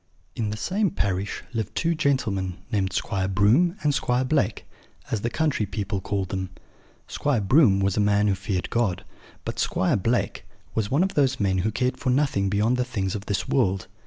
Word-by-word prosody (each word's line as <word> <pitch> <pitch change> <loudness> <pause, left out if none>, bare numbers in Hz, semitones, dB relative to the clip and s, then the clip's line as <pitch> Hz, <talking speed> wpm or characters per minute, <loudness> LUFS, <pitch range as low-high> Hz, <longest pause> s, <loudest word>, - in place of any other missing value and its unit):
In 110 -3 -1
the 105 - -4
same 195 - 0
parish 100 - -2
lived 110 -4 -3
two 170 0 +1
gentlemen, 110 - 0
named 95 -3 0
Squire 95 0 -1
Broom 110 - +3
and 150 -1 +3
Squire 125 -1 +1
Blake, 125 -7 0 0.5
as 110 - 0
the 120 - -1
country 145 -6 0
people 100 -1 -3
called 95 -1 -2
them. 95 -1 -3 0.6
Squire 145 -5 0
Broom 105 -1 +4
was 95 0 +1
a - - +3
man 105 0 +3
who 100 - +3
feared 95 -1 -3
God; 110 -7 0 0.4
but - - -4
Squire 95 - +1
Blake 115 +5 -1 0.3
was 110 -2 -1
one 145 +7 +3
of 195 - -1
those 135 -3 +2
men 95 -3 +1
who 110 +4 0
cared 125 +3 -1
for 130 - -2
nothing 125 -7 +2
beyond 105 +5 +2
the 125 - +2
things 100 -7 -2
of 100 -1 -6
this 100 - -1
world. 95 -8 +1
105 Hz, 190 wpm, -25 LUFS, 95-130 Hz, 0.6 s, Broom